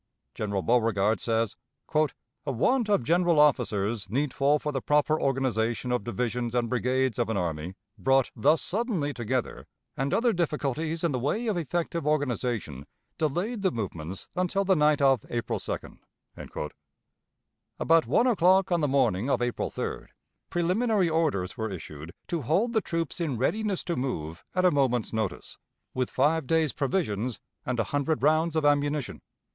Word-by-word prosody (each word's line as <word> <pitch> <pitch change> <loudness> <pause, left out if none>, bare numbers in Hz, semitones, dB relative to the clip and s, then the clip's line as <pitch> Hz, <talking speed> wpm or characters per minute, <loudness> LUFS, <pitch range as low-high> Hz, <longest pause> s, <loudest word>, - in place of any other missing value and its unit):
General 100 -3 -2
Beauregard 110 -3 +2
says, 115 -2 0 0.4
"A 150 -1 -2
want 225 - +1
of 200 -11 +3
general 170 +3 +3
officers 110 -7 +2
needful 140 +4 +2
for 150 0 -3
the 135 -2 -2
proper 150 +3 +2
organization 125 -3 0
of 125 -4 0
divisions 120 0 -2
and 120 -1 +1
brigades 125 +1 0
of 120 - +1
an 110 - 0
army 85 0 -3 0.2
brought 135 +6 +3
thus 150 +3 +3
suddenly 195 - -1
together, 125 0 -3 0.3
and 135 +2 -1
other 235 0 +2
difficulties 160 -1 -1
in 170 - +2
the 130 - -1
way 150 - -1
of 215 -3 0
effective 170 -1 -2
organization, 120 - -1 0.3
delayed 180 - -1
the 190 - +3
movements 95 - -5
until 185 +2 0
the 190 0 +4
night 150 -2 +3
of 135 -4 +4
April 120 -1 -2
2d." - - -6 1.8
About 165 0 +4
one 240 - +3
o'clock 190 -5 +4
on 170 -2 +2
the 150 - +2
morning 130 -5 +1
of - - +2
April 120 -1 -1
3d - - -4 0.4
preliminary 185 +2 +1
orders 150 - 0
were 110 0 -2
issued 80 -4 -8
to 170 -2 -2
hold 185 - +1
the 220 - +3
troops 165 -1 -3
in 145 -7 -1
readiness 200 - 0
to 170 - -2
move 85 - -4
at 185 0 +2
a 180 - +6
moment's 125 -6 +1
notice, 110 -6 -3 0.3
with 130 -1 -1
five 150 +2 +1
days' 160 -2 +2
provisions 130 - -1 0.3
and 125 -1 -1
a - - +3
hundred 145 +1 0
rounds 155 +2 +3
of 155 -2 +1
ammunition. 145 -1 +1
140 Hz, 155 wpm, -27 LUFS, 115-165 Hz, 1.8 s, a